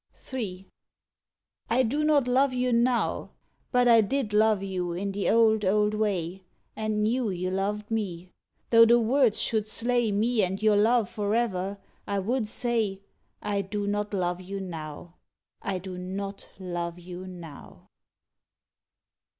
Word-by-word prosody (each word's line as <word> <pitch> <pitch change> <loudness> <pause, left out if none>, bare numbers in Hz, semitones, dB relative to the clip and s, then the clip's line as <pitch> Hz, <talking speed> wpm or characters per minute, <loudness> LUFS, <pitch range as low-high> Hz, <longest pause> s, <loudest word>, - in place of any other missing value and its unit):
III. 195 -7 -4 1.0
I 250 +3 +3
do 285 +6 0
not 295 -4 +3
love 260 +2 +3
you 250 0 +1
now! 235 +1 +1 0.4
But 235 -4 +5
did 265 -6 -1
I - - +3
love 215 -2 +3
you 180 -3 -3
in 195 +3 -3
the 200 0 -1
old, 220 -1 +4
old 210 +2 +2
way, 195 -4 -1 0.3
And 215 -1 -1
knew 235 +1 +1
you 185 0 -2
loved 205 +3 -2
me 185 -5 -3 0.4
'though 230 -1 +8
the 235 +1 +6
words 240 -1 +3
should 215 -2 0
slay 235 +1 0
Me 220 +3 +2
and 190 0 -1
your 215 -1 +4
love 220 +1 +3
forever, 205 -2 -1 0.3
I 200 - -1
would 220 +4 -1
say, 220 -4 -1 0.4
"I 200 -1 0
do 205 +1 -3
not 205 0 -1
love 180 -2 -1
you 195 +2 -6
now! 165 -2 -8 0.4
I 195 -2 -2
do 185 0 -7
not 195 +2 -6
love 175 -2 -4
you 180 +1 -9
now!" 170 -5 -11
205 Hz, 145 wpm, -27 LUFS, 185-230 Hz, 1.0 s, though